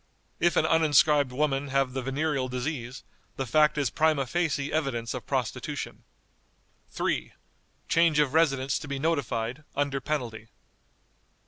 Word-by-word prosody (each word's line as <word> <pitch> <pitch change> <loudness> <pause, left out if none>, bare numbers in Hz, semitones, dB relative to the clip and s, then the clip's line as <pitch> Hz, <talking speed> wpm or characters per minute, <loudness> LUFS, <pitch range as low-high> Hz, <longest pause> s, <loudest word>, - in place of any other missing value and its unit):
If 175 0 +2
an - - +3
uninscribed 150 -3 +4
woman 140 +1 0
have 135 -1 0
the 130 - -2
venereal 135 +1 -1
disease, 125 -1 -4 0.3
the 135 - -3
fact 150 +5 +3
is 140 -6 0
prima 155 -3 +2
facie 150 -1 -1
evidence 135 -7 -1
of - - -7
prostitution." - - -3 0.8
"3. - - -2 0.5
Change 165 -2 +3
of 145 -2 +2
residence 135 -4 +2
to - - -8
be 140 -1 -3
notified, 135 -4 -1
under 140 -1 -1
penalty." 120 -7 -3
140 Hz, 130 wpm, -27 LUFS, 130-155 Hz, 0.8 s, uninscribed